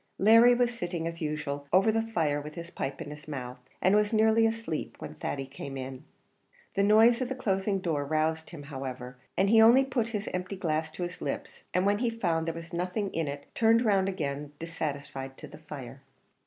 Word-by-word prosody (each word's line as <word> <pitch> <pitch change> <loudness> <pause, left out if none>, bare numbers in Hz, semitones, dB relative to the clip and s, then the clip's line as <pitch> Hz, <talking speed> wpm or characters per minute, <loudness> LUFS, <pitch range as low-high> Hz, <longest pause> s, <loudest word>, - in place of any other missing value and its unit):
Larry 230 +4 +7
was 245 0 +2
sitting, 175 -6 -3
as 165 0 -5
usual, 150 -2 -3
over 195 +4 +5
the 225 +1 +1
fire 160 -10 0
with 150 +1 -9
his 170 0 -7
pipe 135 - -4
in 145 - -9
his 150 +1 -11
mouth, 125 -4 -6 0.2
and 190 +3 +5
was 210 0 +3
nearly 220 0 +4
asleep, 225 -8 -3
when - - -7
Thady 135 -1 -4
came 135 0 -7
in. 130 0 -7 0.7
The 195 - +1
noise 220 +4 +6
of 250 - -1
the 265 - -2
closing 195 -5 0
door 160 -6 -1
roused 155 +2 0
him, 155 -4 -9
however; 130 -3 -6 0.2
but 195 +1 +3
he 225 +1 +7
only 240 +4 +7
put 245 -4 -1
his 210 -2 -3
empty 180 +2 -3
glass 160 -4 -1
to 180 - -4
his 175 +1 -6
lips, - - -5
and 180 +1 +1
when 205 +1 +2
he 240 -1 +1
found 170 -8 -1
there 165 - -2
was 165 +1 -9
nothing 180 +4 -2
in 165 -2 -1
it 140 0 -5
he - - -29
turned 230 +1 +4
round 195 -3 +3
again 145 -5 -4
dissatisfied 140 -4 -5
to - - -9
the - - -12
fire. 140 -4 -9
170 Hz, 210 wpm, -29 LUFS, 145-220 Hz, 0.7 s, Larry